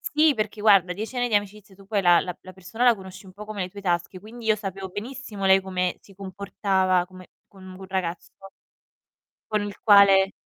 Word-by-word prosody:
Sì, 305 +1 +2
perché 215 -2 -4
guarda 195 -4 +4
10 220 +6 -6
anni 245 0 0
di 220 - -2
amicizia 205 -1 -3
su 195 +1 -17
poi 200 +1 -1
la 175 -2 +5
la 185 +1 -9
persona 190 +6 -4
la 240 -1 +6
conosci 190 -1 -12
un 185 - -14
po' 210 +2 -9
come 210 -1 -7
le 180 - -2
tue 200 +2 -11
tasche, 175 0 -2
quindi 220 +4 -11
io 215 -1 +3
sapevo 195 -2 -6
benissimo 215 0 -7
lei 190 0 +5
come 185 -1 -2
si 195 - -19
comportava 190 -1 -1
come 185 0 -15 0.2
con 195 -1 -18 0.2
un 195 - -10
ragazzo 185 -2 -4 1.2
con 215 -1 -1
il 205 -1 -7
quale 200 -2 +6
195 Hz, 200 wpm, -24 LUFS, 185-210 Hz, 1.2 s, la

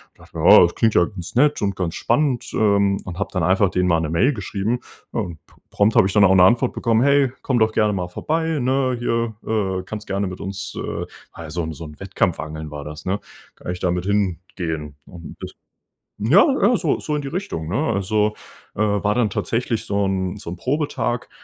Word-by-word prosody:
Dachte - - -14
mir: - - -3
„Oh, - - +9
das 85 -1 +3
klingt 110 -2 +2
ja 90 - +5
ganz 90 -3 -8
nett 145 +4 +3
und 100 -1 0
ganz 90 -3 -3
spannend.“ 130 0 0
Ähm, 100 -2 +2
und 90 -2 -7
habe - - -2
dann - - -1
einfach 95 +1 +3
denen 90 0 +1
mal 85 -2 +3
'ne 80 -1 -2
Mail 125 - +3
geschrieben. 105 +2 -2 0.3
Ja - - -1
und 85 -6 -7
p - - -24 0.2
prompt 105 +2 +2
habe - - +6
ich 95 - -1
dann 105 -1 +5
auch 95 0 +6
'ne 90 - +7
Antwort 120 +6 +4
bekommen: 115 -1 +1
„Hey, 140 -2 +4
komm 130 - 0
doch 110 -1 +3
gerne 105 -1 +2
mal 90 -2 -3
vorbei, 160 - -1
ne? 130 0 +1
Hier, 115 -1 -1 0.2
äh, 95 -4 0
kannst 105 +2 -7
du - - -4
gerne 100 0 0
mit 90 0 -7
uns“ 100 +1 -5
äh, - - -4 0.3
ja, 80 -1 -8
so 85 +2 -2
'n 80 0 -4
so 80 - -8
'n 75 -1 -12
Wettkampfangeln 80 -6 -2
war 75 -1 -7
das, 75 +1 -9
ne? 95 +2 -1 0.4
Kann - - -6
ich 90 - -5
da 90 - 0
mit 90 +1 -1
hingehen 90 -6 -2
und 85 -2 -10
das - - -8 0.7
Ja, 140 - +6 0.2
ja, 245 - +4
so 165 -9 0
so 150 - -2
in 150 - -1
die 140 - -5
Richtung, 145 - -4
ne? 100 - -1 0.2
Also, 105 +2 0 0.4
äh, 105 - -2
war 105 0 +1
dann 120 -4 +2
tatsächlich 115 +3 -2
so 100 0 0
'n 95 -1 -1
so - - -8
'n 90 - -6
Probetag, 125 - -2
100 Hz, 225 wpm, -21 LUFS, 90-120 Hz, 0.7 s, Oh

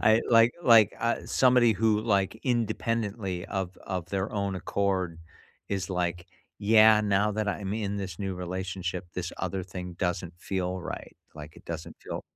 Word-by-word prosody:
I 110 +1 +5
like 115 0 +6
like, 115 -6 +7
uh, 115 0 -1
somebody 125 -3 +4
who, 110 +1 +2
like, 100 -1 0
independently 110 -5 -1
of 95 -1 -3
of 90 -3 -3
their 100 +4 -2
own 100 -2 -1
accord 95 -3 -1 0.5
is 100 -1 -2
like, 90 -1 -2 0.3
"Yeah, 110 +1 +6
now 105 0 +2
that 105 0 -1
I'm 100 0 -2
in 100 -2 -2
this 95 -4 -5
new 95 -2 -3
relationship, 90 0 -4
this 85 -2 -4
other 95 0 -3
thing 90 -1 -7
doesn't 90 -2 -2
feel 95 0 -2
right, - - -7 0.2
like, 75 0 -10
it - - -15
doesn't 80 -1 -6
feel" - - -6
95 Hz, 160 wpm, -28 LUFS, 90-110 Hz, 0.5 s, like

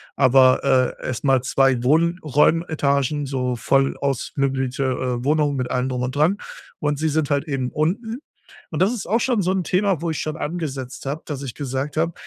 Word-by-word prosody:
aber, 130 -1 +5 0.4
äh, - - -5
erst 130 +1 -4
mal 135 -2 +3
2 135 -1 +2
Wohnraummetagen, 150 -2 +2
so 125 -2 -2
voll 135 +4 +1
ausmöblierte, 135 -1 -1
äh, 125 -1 -1
Wohnungen 150 -1 +2
mit 125 -1 -3
allem 125 +1 0
drum 125 -1 -2
und 130 +2 -3
dran. 165 +8 +3 0.4
Und 150 -1 -1
sie 160 0 +1
sind 155 -1 0
halt 145 +2 0
eben 135 -4 -2
unten. 215 - -1 0.5
Und - - 0
das 200 +5 +3
ist 235 - -5
auch 225 +5 +1
schon 240 -6 +1
so 185 +2 +1
'n 190 -1 0
Thema, 185 0 +1
wo 170 - -1
ich 160 - -3
schon 155 0 -3
angesetzt 140 -6 -5
habe, 145 +3 -3
dass 140 -3 -5
ich 125 -4 -6
gesagt 140 +1 -4
habe: 165 +2 +1
140 Hz, 190 wpm, -22 LUFS, 130-160 Hz, 0.5 s, aber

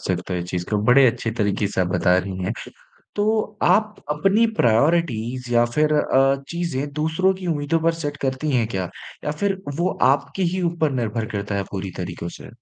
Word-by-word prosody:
सकते 90 0 -2
है 90 - -1
इस - - -8
चीज़ 90 -1 -2
को। 105 - +2
बड़े 130 +3 +6
अच्छे 115 0 -4
तरीके 105 -1 +1
से 100 - -2
आप 90 - +2
बता 90 0 +3
रही 95 0 -4
हैं, 95 - -1 0.6
तो 215 0 0
आप 215 0 +3 0.2
अपनी 195 +9 +3
प्रायोरिटीज़ 125 -1 +1
या 120 0 +5
फिर 155 0 +3
अ, 135 -2 +3
चीज़ें 170 -5 -2
दूसरों 160 +5 +1
की 185 -1 -7
उम्मीदों 160 0 0
पर 165 +1 +3
सेट 145 -1 -3
करती 130 +3 -1
हैं 120 -4 +2
क्या? 95 -5 -3 0.3
या - - -1
फिर 195 -1 0 0.2
वो 175 - +2 0.2
आपके 140 +6 -2
ही 185 - -1
ऊपर 160 -3 0
निर्भर 115 -3 -2
करता 100 0 -3
है 100 - 0
पूरी 95 -1 -4
तरीकों 85 -1 -5
से? - - -11
135 Hz, 195 wpm, -22 LUFS, 105-165 Hz, 0.6 s, बड़े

